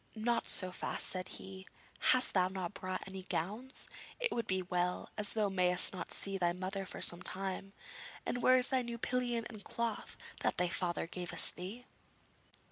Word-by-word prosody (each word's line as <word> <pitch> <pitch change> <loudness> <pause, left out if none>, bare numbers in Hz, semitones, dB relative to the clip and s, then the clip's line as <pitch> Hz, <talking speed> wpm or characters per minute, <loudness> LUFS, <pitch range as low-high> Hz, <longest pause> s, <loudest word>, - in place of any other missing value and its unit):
'Not 230 +2 +1
so 185 -1 +3
fast,' - - -2
said 185 -1 -3
he; 190 0 -7 0.4
'hast 255 0 +4
thou 185 -2 +4
not 185 -1 -4
brought 185 -1 -4
any 190 0 -6
gowns? 210 - -4 0.3
It 485 -2 +2
would 235 - -1
be 190 0 +1
well, 180 0 -1
as 210 -1 0
thou 215 -2 +2
mayst 180 -1 +3
not 180 -3 -5
see 195 -1 -1
thy 175 -1 +3
mother 190 +2 -3
for - - -3
some 175 - +3
time; 195 +1 -4 0.5
and 245 - -1
where 255 +1 +7
is 250 0 +7
thy 260 -1 +3
new 235 -1 -4
pillion 240 -1 0
and 215 -4 -9
cloth 235 -2 -3 0.2
that - - +1
thy 180 -1 +2
father 175 -1 -1
gavest 175 +1 +1
thee?' 200 +8 -6
195 Hz, 180 wpm, -35 LUFS, 180-235 Hz, 0.5 s, where